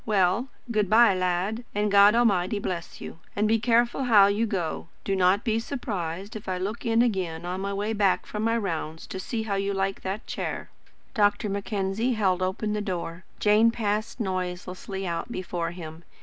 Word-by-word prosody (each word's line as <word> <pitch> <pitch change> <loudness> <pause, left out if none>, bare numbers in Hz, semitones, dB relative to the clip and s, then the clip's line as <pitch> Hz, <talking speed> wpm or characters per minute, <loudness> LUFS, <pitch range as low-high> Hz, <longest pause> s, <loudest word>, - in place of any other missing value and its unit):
Well, 205 +3 +2 0.2
good 210 -4 +1
bye, 225 -1 +6
lad, 185 +5 -1
and 210 0 +1
God 200 +2 +7
Almighty 205 -4 +2
bless 180 -4 -4
you. - - -8 0.2
And 210 +1 +2
be 225 +1 +3
careful 240 +3 +2
how 210 -5 +7
you 205 +3 +1
go. 175 -6 -3 0.2
Do 195 - 0
not 190 +2 +3
be 225 -1 +1
surprised 200 - -4
if 210 -3 -6
I 185 - -1
look 205 +6 -4
in 230 +1 +4
again 180 -7 -1
on 180 +2 -3
my 200 0 -2
way 205 +2 -1
back 200 -3 +2
from 210 - -5
my 230 +1 +2
rounds 165 -6 -3
to 190 - -6
see 220 +4 -3
how 215 -2 -2
you 195 0 -1
like 195 0 -1
that 195 +4 -4
chair." - - -4 0.4
Dr. 205 0 +2
Mackenzie 200 +4 -1
held 190 -5 +1
open 190 +3 -1
the 210 - -1
door. 180 -3 -4
Jane 215 +2 +5
passed 220 +1 -2
noiselessly 185 0 -4
out 170 +5 -3
before 175 -4 -3
him. 165 -1 -9
200 Hz, 185 wpm, -26 LUFS, 185-220 Hz, 0.4 s, God